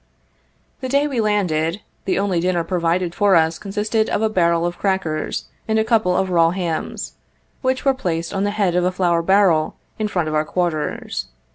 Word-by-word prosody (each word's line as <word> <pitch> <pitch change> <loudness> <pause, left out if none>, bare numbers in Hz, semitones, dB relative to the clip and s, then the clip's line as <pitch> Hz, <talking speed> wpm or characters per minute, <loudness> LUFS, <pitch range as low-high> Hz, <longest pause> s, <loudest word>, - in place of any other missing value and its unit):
The 260 - -4
day 280 +2 +3
we 260 -5 -1
landed, 185 -4 0 0.2
the 190 - 0
only 195 -3 +1
dinner 175 -1 +1
provided 170 0 0
for 200 0 +3
us 160 0 +2
consisted 215 +2 -1
of 215 - 0
a 220 - +3
barrel 170 -4 +2
of 175 0 -3
crackers 190 -6 -1 0.2
and 220 0 +1
a 220 - +3
couple 220 -6 +2
of 190 -1 0
raw 165 -2 +4
hams, 170 -3 -3 0.5
which 260 0 0
were 270 - +5
placed 170 -9 -3
on 195 - 0
the 205 - +1
head 205 -4 0
of 180 0 +2
a 180 - +2
flour 175 -2 +1
barrel, 180 -3 +3 0.2
in 215 - 0
front 175 -6 -1
of 155 - -2
our 155 0 +2
quarters. 155 - -2
180 Hz, 190 wpm, -20 LUFS, 170-210 Hz, 0.5 s, were